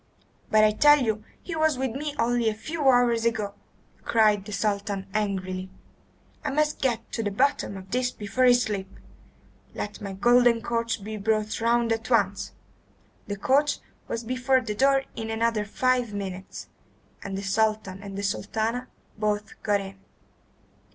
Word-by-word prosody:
"But 215 0 +5
I 215 - +5
tell 295 +7 +6
you 215 -2 -1 0.2
he 340 - -5
was 315 -3 +2
with 260 -1 -1
me 290 +4 -4
only 235 -1 +2
a 215 - -3
few 295 +5 0
hours 245 -2 +4
ago," 220 -3 0 0.5
cried 210 -3 +3
the 210 - -8
Sultan 200 -1 -1
angrily. 190 -3 -2 0.7
"I - - -1
must 300 +2 0
get 245 -4 -1
to 225 - -2
the 210 - -1
bottom 230 -2 0
of 190 0 -11
this 250 0 +1
before 235 +2 -1
I 250 - +7
sleep! 210 -5 0 0.9
Let 205 0 -5
my 200 -2 -5
golden 240 +3 +4
coach 230 -3 -1
be 215 +1 -5
brought 215 +1 0
round 235 0 +2
at 225 0 -2
once." 200 -5 +1 0.8
The 205 - -4
coach 280 +8 +2 0.3
was 230 - -3
before 255 +2 +1
the 225 -4 -3
door 270 +4 +3
in 225 -1 -5
another 225 -1 0
five 245 0 0
minutes, 190 -1 -6 0.5
and 195 -1 -5
the 195 - -4
Sultan 210 -1 0
and 200 0 -5
Sultana 225 +4 -2 0.3
both 210 0 -2
got 205 -2 +1
in. 195 0 -9
220 Hz, 160 wpm, -26 LUFS, 205-245 Hz, 0.9 s, I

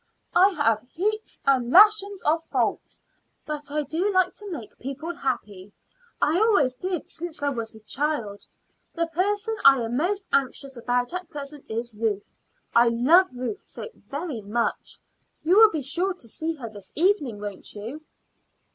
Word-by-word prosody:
"I 370 +3 +6
have 225 - +1
heaps 430 +5 -2
and 260 -3 +3
lashons 405 +3 +6
of 325 +2 +2
faults; - - -2 0.4
but 295 -1 -5
I 300 +1 -1
do 335 +8 -1
like 370 -1 +3
to 410 -1 -7
make 270 - -8
people 275 +6 -5
happy. 210 - -4 0.5
I 320 +4 +2
always 400 - +4
did 360 +5 -4
since 330 -3 -6
I 285 - +2
was 230 -4 -4
a - - -11
little 220 - -19
child. 270 -9 -2 0.5
The 335 0 +1
person 410 +6 0
I 275 0 +8
am 235 +1 -2
most 385 +6 0
anxious 275 0 0
about 245 +3 -1
at 360 -2 -5
present 290 -1 -8
is 230 +1 -4
Ruth: 210 -2 -2 0.4
I 235 +1 +6
love 275 +11 +5
Ruth 255 +11 -4
so - - -7
very 285 -5 -6
much. 225 +3 -2 0.5
You 350 +5 +4
will 440 0 +9
be 310 -7 -3
sure 355 +8 0
to 250 - -8
see 320 +8 -2
her 255 -6 -7
this 205 -3 -11
evening, 305 - +1
won't 205 -1 -7
you?" 230 +9 -7
290 Hz, 165 wpm, -25 LUFS, 235-360 Hz, 0.5 s, will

